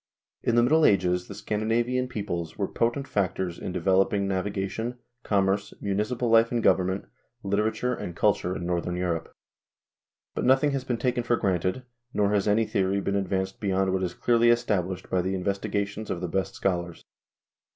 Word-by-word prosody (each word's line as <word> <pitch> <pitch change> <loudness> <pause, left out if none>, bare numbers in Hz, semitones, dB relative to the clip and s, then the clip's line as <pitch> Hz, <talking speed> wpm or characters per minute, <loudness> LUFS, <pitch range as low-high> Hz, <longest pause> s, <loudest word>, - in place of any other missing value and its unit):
In 120 - +1
the 120 - +5
Middle 155 +6 +4
Ages 90 -5 +3
the 100 - -8
Scandinavian 115 +5 0
peoples 85 -9 -4
were - - 0
potent 120 +4 -1
factors 95 -3 -1
in - - -4
developing 95 +3 +2
navigation, 100 +5 -2 0.2
commerce, 100 0 0
municipal 105 +5 -1
life 115 0 +5
and 120 -2 0
government, 95 +1 +2 0.4
literature 110 +5 0
and 90 -7 -6
culture 90 +1 +1
in 85 - -4
northern 90 0 -1
Europe. 85 -2 -2 1.0
But - - -2
nothing 135 +3 +4
has 135 -2 -2
been 125 -2 -2
taken 125 +1 0
for 120 0 +1
granted, 95 +4 0 0.3
nor 100 -1 +2
has 100 -1 +1
any 110 +2 +3
theory 100 -1 0
been 100 0 -1
advanced 95 +1 -1
beyond 95 -3 +1
what 95 - 0
is 90 -2 -2
clearly 120 -1 +3
established 95 -6 0
by 90 - +1
the 95 +2 -1
investigations 100 +2 -2
of 85 - -2
the 90 - -3
best 95 +2 -2
schol 90 -3 +1
ars. 85 -1 -13
100 Hz, 170 wpm, -26 LUFS, 95-115 Hz, 1.0 s, the